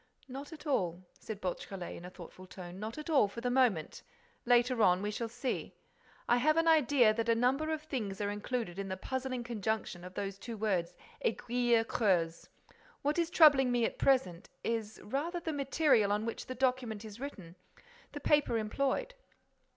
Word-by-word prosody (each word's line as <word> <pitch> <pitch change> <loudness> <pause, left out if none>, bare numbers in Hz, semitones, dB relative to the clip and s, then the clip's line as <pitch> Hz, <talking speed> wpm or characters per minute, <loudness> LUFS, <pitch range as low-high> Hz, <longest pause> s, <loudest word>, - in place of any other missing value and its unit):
"Not 275 +3 -8
at 320 0 -11
all," 185 - 0 0.2
said 220 -3 -7
Beautrelet, 185 -1 -5
in 175 - -9
a - - -7
thoughtful 185 0 -12
tone. 180 0 -9
"Not 220 +5 -5
at 305 - -7
all, 290 -10 +4
for 205 - -8
the 245 +1 -1
moment.—Later 245 +2 +1
on, 180 -1 +4
we 210 - -1
shall 230 +2 -3
see.—I 245 0 -4
have 310 +6 +3
an 330 0 +3
idea 280 -8 +5
that 230 +1 -2
a 230 - +5
number 265 +6 +1
of 310 -1 -3
things 220 -11 -4
are 205 -1 -1
included 205 -3 -3
in 195 - -3
the 190 0 -4
puzzling 255 +3 -3
conjunction 220 -5 -3
of 180 0 -10
those 195 -1 -4
two 230 +1 -7
words, 190 -5 -1 0.3
aiguille 240 - +2
creuse. 175 -8 0 0.5
What 295 +4 +1
is 335 -1 +1
troubling 290 -7 +6
me 240 -1 +2
at - - -4
present 250 -11 +2
is 220 -2 -2
rather 305 - -2
the 325 -2 -3
material 275 -6 +3
on 210 +2 0
which 230 - -5
the 255 - -5
document 250 -4 -1
is 215 +1 -10
written, 195 -12 -8 0.6
the 290 - -5
paper 290 -4 +2
employed. 265 - -1
235 Hz, 175 wpm, -32 LUFS, 200-270 Hz, 0.6 s, troubling